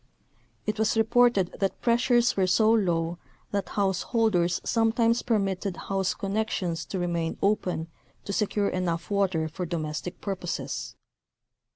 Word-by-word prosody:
It 215 0 -2
was 220 +1 +2
reported 225 -4 +3
that 195 -1 -1
pressures 240 0 +3
were 190 -2 +2
so 220 +4 +4
low 175 -6 +1 0.3
that 200 -3 -2
householders 195 -2 +1
sometimes 230 +1 +2
permitted 195 -4 -1
house 195 -1 -1
connections 195 -5 -2
to 195 - -4
remain 170 -2 -1
open 185 -5 0 0.4
to 200 - -3
secure 205 +1 +1
enough 175 0 -2
water 190 -6 +1
for 170 +4 -5
domestic 160 +2 -4
purposes. 190 -4 -4
195 Hz, 125 wpm, -27 LUFS, 175-220 Hz, 0.4 s, so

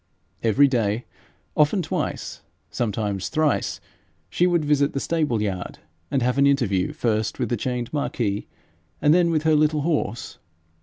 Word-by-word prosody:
Every 125 +6 +4
day, 115 -3 0 0.5
often 155 +5 +3
twice, 160 - -3 0.3
sometimes 105 -4 -2
thrice, 155 -2 0 0.5
she 180 - +3
would 170 -3 +1
visit 145 -1 +2
the 140 - -1
stable 145 -9 0
yard, 95 -3 -4 0.3
and 135 -3 0
have 125 +2 +1
an 140 - +5
interview 110 -10 +1
first 110 -2 -1
with 125 -4 -2
the 120 - +1
chained 120 +2 -3
Marquis, 115 -8 -2 0.5
and 150 - +4
then 175 0 +4
with 155 -2 +1
her 160 0 +3
little 150 0 +3
horse. 145 -7 -2
135 Hz, 150 wpm, -23 LUFS, 110-150 Hz, 0.5 s, an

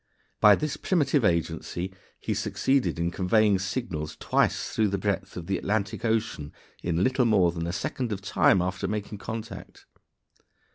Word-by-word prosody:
By 105 -2 +8
this 150 +4 -3
primitive 145 -7 +1
agency 85 +1 -1 0.3
he - - -2
succeeded 130 -13 0
in 85 +1 -1
conveying 100 +2 +3
signals 95 -6 -3
twice - - +1
through 110 -1 +2
the 100 0 -1
breadth 100 -1 -2
of 85 - -6
the 95 0 -1
Atlantic 105 0 -2
Ocean 110 -10 -1 0.3
in 85 +1 0
little 130 +1 +2
more 95 -6 +4
than 85 0 -4
a - - -1
second 120 +6 -3
of 100 - -2
time 95 -1 +3
after 95 +1 -2
making 105 -1 -4
contact. 110 +1 -7
100 Hz, 155 wpm, -27 LUFS, 90-110 Hz, 0.3 s, By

